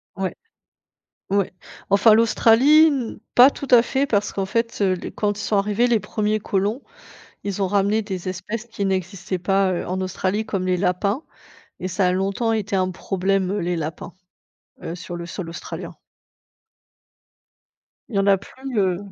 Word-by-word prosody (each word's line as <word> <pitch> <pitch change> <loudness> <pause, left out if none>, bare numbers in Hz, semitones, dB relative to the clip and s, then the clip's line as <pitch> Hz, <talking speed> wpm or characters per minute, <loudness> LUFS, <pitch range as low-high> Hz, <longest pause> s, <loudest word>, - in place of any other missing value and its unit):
Ouais. 190 -1 -3 0.9
Ouais, 200 -1 0 0.4
enfin 205 +2 +6
l'Australie 235 +7 +5
n 265 -8 -1 0.2
pas 250 +3 +8
tout 280 - -7
à 235 - +8
fait, 270 +3 0
parce 205 -4 0
qu'en 195 -1 -2
fait, 230 +3 -1
heu, 190 -2 +3
les 180 - -4
quand 205 -1 -1
ils 215 - -5
sont 210 - 0
arrivés, 210 +4 +2
les 235 -2 +3
1ers 215 0 -1
colons, 205 +5 -1 0.6
ils 200 0 -3
ont 190 - +2
ramené 205 +2 +2
des 190 -4 -5
espèces 215 +5 -5
qui 225 -3 -5
n'existaient 190 0 -2
pas, 195 +1 +1
heu, 175 - -2
en 185 +1 -3
Australie. 190 +3 -1
Comme 190 -2 -2
les 185 0 +2
lapins 200 - 0 0.6
et 185 - -3
ça 185 +1 0
a - - +3
longtemps 195 +5 0
été 210 -2 -1
un 185 -1 +1
problème, 190 +1 -1
heu, 205 - -1
les 175 +1 -1
lapins, 160 -1 -5 0.7
heu, 170 - -5
sur 175 0 -7
le 170 0 -6
sol 175 0 -6
australien. 170 - -7 2.1
Il 220 - -7
y 195 - +3
en 195 - +1
a 195 -1 +5
plus, 260 +5 -8
heu, 185 -3 +2
200 Hz, 175 wpm, -22 LUFS, 185-220 Hz, 2.1 s, pas